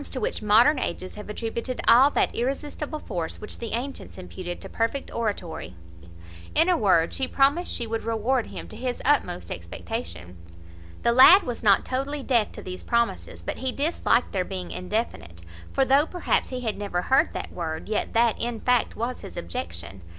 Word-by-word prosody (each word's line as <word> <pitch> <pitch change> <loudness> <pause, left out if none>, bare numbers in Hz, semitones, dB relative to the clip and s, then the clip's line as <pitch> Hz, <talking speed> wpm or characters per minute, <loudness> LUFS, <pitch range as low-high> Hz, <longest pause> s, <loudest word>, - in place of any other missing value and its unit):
to 260 - -4
which - - -2
modern 230 +7 +5
ages 185 - -4
have 210 0 -9
attributed 230 +3 -4
all 250 +5 +8
that - - +1
irresistible 290 +4 -3
force 175 - -5
which 210 - -8
the 230 - -4
antients 260 +4 -5
imputed 180 -1 -7
to - - -8
perfect 230 +4 -2
oratory. 180 - -3 0.8
In 330 +3 +5
a 360 - +5
word, 185 - +3
she 265 - -1
promised 285 +6 +2
she 240 - -3
would 225 0 -3
reward 230 +2 0
him - - -7
to - - -9
his 245 +2 -3
utmost 90 - +1
expectation. 85 +1 -6 0.7
The 235 - +4
lad 300 +11 +9
was 245 -2 -4
not 200 -3 +4
totally 275 +2 -2
deaf 235 -6 +2
to - - -9
these 185 0 -7
promises; 235 -1 -1
but - - -4
he 260 -1 -2
disliked 285 -3 +1
their 185 -2 0
being 185 -1 -5
indefinite; 180 - -4 0.3
for, 270 - +2
though 275 +4 +4
perhaps 355 0 0
he 255 -1 -4
had 220 -4 -2
never 190 -4 -2
heard 265 - +3
that - - -5
word, 160 -2 -4
yet 215 - -2
that, 230 -1 +2
in 235 -1 -1
fact, 250 0 +1
was 240 +3 -3
his - - -10
objection. 85 +2 -6
230 Hz, 180 wpm, -25 LUFS, 185-260 Hz, 0.8 s, lad